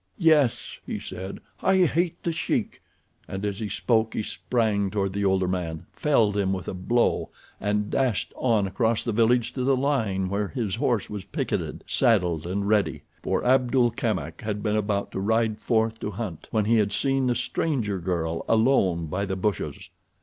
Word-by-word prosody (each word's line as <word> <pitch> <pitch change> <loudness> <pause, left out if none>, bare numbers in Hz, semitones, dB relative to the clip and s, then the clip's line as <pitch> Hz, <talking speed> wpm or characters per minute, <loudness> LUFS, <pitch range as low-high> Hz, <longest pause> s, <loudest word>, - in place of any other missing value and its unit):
"Yes," 155 -7 +2
he - - -4
said, 95 +1 -6 0.2
"I 190 -1 +4
hate 170 +1 0
the 170 - 0
Sheik," 160 - -2 0.5
and 95 +2 -4
as 100 -1 -2
he 110 -2 -3
spoke 110 0 +1
he - - -1
sprang 105 -4 0
toward 100 -1 -1
the 100 0 -1
older 95 -1 +2
man, 85 -3 -3
felled 115 -9 +2
him 100 -2 +1
with 95 -3 -5
a - - -3
blow 120 +6 +1 0.3
and 105 0 -1
dashed 130 -7 0
on 115 -5 +2
across 110 +4 0
the 120 - -1
village 120 +2 +2
to 130 - -2
the 135 +1 +3
line 115 -9 0
where 100 +2 -1
his 115 -7 -3
horse 115 -4 +1
was 105 -2 -6
picketed, - - -3
saddled 90 - +2
and 100 +2 -2
ready, 105 -1 +1 0.2
for - - -1
Abdul 125 -1 +3
Kamak 85 -9 -3
had 105 -1 -3
been 105 -1 +1
about 100 -1 -1
to - - -4
ride 110 +2 +1
forth 110 -1 +1
to - - -3
hunt 100 -5 -6
when 110 -2 +1
he 115 +2 +3
had 105 -2 +2
seen 135 -1 +1
the 120 - +2
stranger 120 - -1
girl 85 -2 -2
alone 110 -8 +3
by 90 +6 -2
the 95 -1 -2
bushes. 95 0 -2
105 Hz, 180 wpm, -25 LUFS, 95-120 Hz, 0.5 s, I